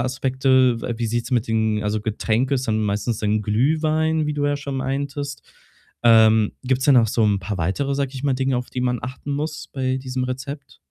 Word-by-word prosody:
Aspekte? 130 -1 +2
We 120 - -3
wie 115 - -1
sieht's 120 +3 -2
mit 120 -3 +1
den 110 -1 +1
also, 105 +1 -1
Getränke 110 +5 0
ist 130 0 -2
dann 110 0 +1
meistens 105 +2 -1
dann 105 0 0
Glühwein, 155 +7 +1
wie 150 - -1
du 145 -1 -1
ja 145 - +1
schon 140 -1 -5
meintest. 140 +1 -3 0.6
Ähm, 110 -2 +5
gibt 130 0 +1
es - - -1
denn 140 - +6
noch 115 -3 +5
so 110 +1 +1
'n 100 -2 +2
paar 100 +2 -4
weitere, 135 - -1
sage 140 -1 -1
ich 130 - -6
mal, 140 -2 +1
Dinge, 130 0 0
auf 125 0 -4
die 125 - -4
man 125 -1 0
achten 135 +3 -5
muss 150 0 -4
bei 130 -1 -1
diesem 130 -1 -3
Rezept? 130 +3 -6
130 Hz, 215 wpm, -22 LUFS, 110-140 Hz, 0.6 s, denn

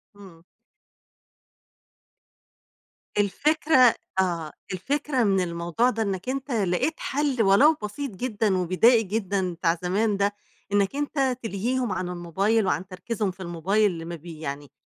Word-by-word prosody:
إمم. 180 -5 -15 2.7
الفكرة 260 +4 +4 0.2
آه، 170 -4 0 0.2
الفكرة 275 +5 -1
من 195 -2 +2
الموضوع 170 +7 0
ده 225 -2 -1
إنك 195 +3 -3
أنت 270 0 -3
لقيت 205 - 0
حل 275 -3 0
ولو 230 +12 +6
بسيط 250 +6 -4
جدًا 210 -2 -1
وبدائي 220 +7 +4
جدًا 195 -3 -1
بتاع 170 0 0
زمان 200 +3 +1
ده، 200 +1 +1 0.4
إنك 200 +5 +2
أنت 275 -3 0
تلهيهم 230 +3 -1
عن 180 -1 -2
الموبايل، 190 +5 0
وعن 185 0 -1
تركيزهم 200 +2 -3
في 185 - -20
الموبايل 190 +5 +1
اللي 165 -2 -7
ما 170 0 -5
بي 165 0 -10
يعني، 145 -2 -6
200 Hz, 130 wpm, -25 LUFS, 180-245 Hz, 2.7 s, ولو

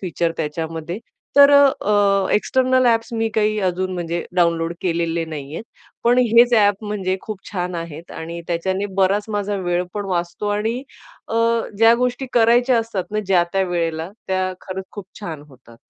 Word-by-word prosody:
Feature 170 -2 -1
त्याच्यामध्ये. 160 +3 -4 0.4
तर 280 0 +9
अ, 285 0 +8 0.2
अ, 200 -2 +3
external 255 +3 +2
apps 230 0 +1
मी 225 0 0
काही 215 0 +1
अजून 185 +1 -2
म्हणजे 170 -1 -3
डाउनलोड 170 -1 +2
केलेले 170 -1 0
नाहीये, 155 +3 -7 0.4
पण 245 +1 +4
हेच 240 0 +5
ॲप 205 -1 +3
म्हणजे 195 -3 -2
खूप 210 -3 -7
छान 180 -1 -3
आहेत. 165 -1 -7
आणि 170 +1 -6
त्याच्याने 190 +4 -1
बराच 195 +2 +2
माझा 205 -1 -2
वेळ 175 -1 -1
पण 205 -1 -3
वाचतो 175 +3 -2
आणि 225 +5 -2 0.5
अ, - - -4 0.4
ज्या 225 +1 +7
गोष्टी 250 +2 -1
करायच्या 240 +1 +4
असतात 225 -5 -3
ना, 215 0 -1
ज्या-त्या 190 0 +2
वेळेला, 165 0 -2 0.2
त्या 185 0 -1
खरंच 190 0 -6
खूप 205 -2 -8 0.2
छान 160 -7 -6
होतात. 120 -3 -18
190 Hz, 160 wpm, -20 LUFS, 170-220 Hz, 0.5 s, तर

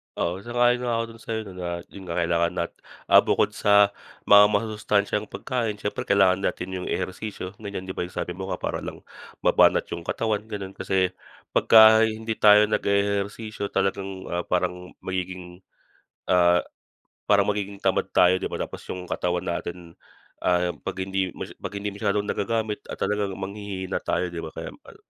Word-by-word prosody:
Oo, 90 +2 -1
sang-ayon 120 +2 +2
nga 120 - +1
ako 115 - 0
dun 115 - -16
sa'yo 110 -1 -3
na - - -11
lahat 85 -1 -4
yun 95 -2 -10
kakailanganin 85 0 0
nat - - -6 0.4
ah, - - +10
bukod - - +1
sa 100 0 +5 0.3
mga 105 0 +8
masusustansyang 105 -1 0
pagkain 115 -5 -2
siyempre 105 0 -4
kailangan 95 -2 +4
natin 95 -2 -2
yung 90 -1 -4
ehersisyo 95 -1 -4
ganyan, 100 -3 -6
di 95 - -5
ba? - - -4
Yung 90 - -17
sabi 90 - -3
mo 95 +2 -6
para - - -3
lang - - -8 0.4
mabanat - - +5
yung 85 - -4
katawan 110 -2 -1
gano'n, 100 -3 -6
kasi 95 -1 0 0.4
pagka 110 0 +7
hindi 110 +1 -3
tayo 105 0 +7
nag-e-ehersisyo 100 +1 -1
talagang, 95 0 -2
ah, 85 0 0
parang 90 0 -2
magiging, 90 -1 -5 0.7
ah, 90 -1 +5 0.7
parang 100 -1 +4
magiging 100 -1 -4
tamad - - +1
tayo, 90 +1 +6
di - - -4
ba? - - -5
Tapos - - -7
yung 90 -1 -5
katawan 90 0 -1
natin, 85 0 -5 0.5
ah, 90 0 +2
'pag 95 -1 -4
hindi 95 -1 -1 0.3
'pag - - -5
hindi 100 +1 -3
masyadong 100 0 0
nagagamit 110 0 -1
at - - -5
talagang 100 -2 -1
manghihhina 95 -1 -4
tayo, 90 +1 -1
di 85 - -7
ba? 80 - -5
Kaya - - -5
mal - - -16
100 Hz, 165 wpm, -25 LUFS, 90-105 Hz, 0.7 s, ah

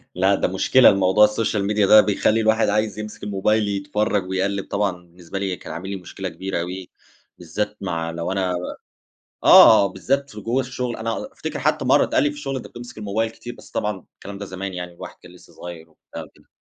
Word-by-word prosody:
لأ، 95 +2 +3
ده - - 0
مشكلة 95 +7 +5
الموضوع 100 +2 +4
الsocial 105 -1 -1
media 105 -2 +2
ده 110 0 +9
بيخلِّي 105 +2 +1
الواحد 110 -1 +2
عايِز 105 0 0
يمسك 105 0 -8
الموبايل 105 +1 +1
يتفرَّج 100 -1 -1
ويقلِّب 95 +1 -1
طبعًا، 100 -1 0
بالنسبة 90 +1 -9
لي 95 -2 -2
كان - - -9
عامل 90 +4 -6
لي 100 - -3
مشكلة 95 +1 -7
كبيرة 85 +1 -4
أوي، 90 +1 -6 0.5
بالذات 105 +5 -4
مع 85 -3 -3
لو 85 +2 -4
أنا 95 -2 -1 0.9
آه، 100 - +8
بالذات 135 +9 -2
في 105 - -9
جوّا 120 +5 0
الشغل، 125 -1 -4
أنا 115 +1 -3
على - - -5
أفتكِر - - -5
حتى - - 0
مرَّة - - +4
اتقال - - +1
لي 145 - +2
في 145 - -10
الشغل: 135 -2 -4
"أنتَ 130 - -6
بتمسك 120 -1 -11
الموبايل 110 +2 -2
كتير." 120 +2 -10
بس - - -16
طبعًا 105 -3 -3
الكلام 100 0 -10
ده 100 - -6
زمان 95 0 -6
يعني، 90 0 -6
الواحد - - -10
كان 90 - -14
لسه 90 - -18
صغيِّر 85 -2 -10
وبتاع - - -11
وكده. - - -22
100 Hz, 205 wpm, -22 LUFS, 95-110 Hz, 0.9 s, ده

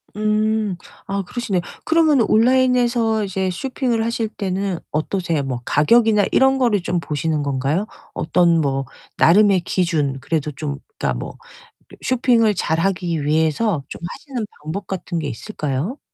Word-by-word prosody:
음. 215 -2 0 0.3
아, 195 0 -2
그러시네. 195 -2 -2 0.2
그러면은 315 -7 +3
온라인에서 240 -2 +3
이제 190 -1 -1
쇼핑을 240 - -1
하실 230 -1 -1
때는 195 -3 -3
어떠세요? 165 -1 -1
뭐 130 -3 -4
가격이나 210 +6 +4
이런 265 0 +4
거를 235 -7 +2
좀 175 0 -1
보시는 155 -1 -2
건가요? 140 +7 0 0.3
어떤 170 0 +2
뭐 135 -2 -1 0.3
나름의 195 +1 +5
기준, 160 -7 0
그래도 155 -1 -1
좀 145 0 -4 0.2
그러니까 - - 0
뭐 - - -7 0.7
쇼핑을 240 -4 +3
잘하기 170 -2 -1
위해서 160 +3 +1
좀 - - -9
하시는 260 - -5 0.2
방법 175 +5 -5
같은 175 -2 -3
게 155 - -3
있을까요? 150 - -4
190 Hz, 310 characters per minute, -20 LUFS, 155-225 Hz, 0.7 s, 나름의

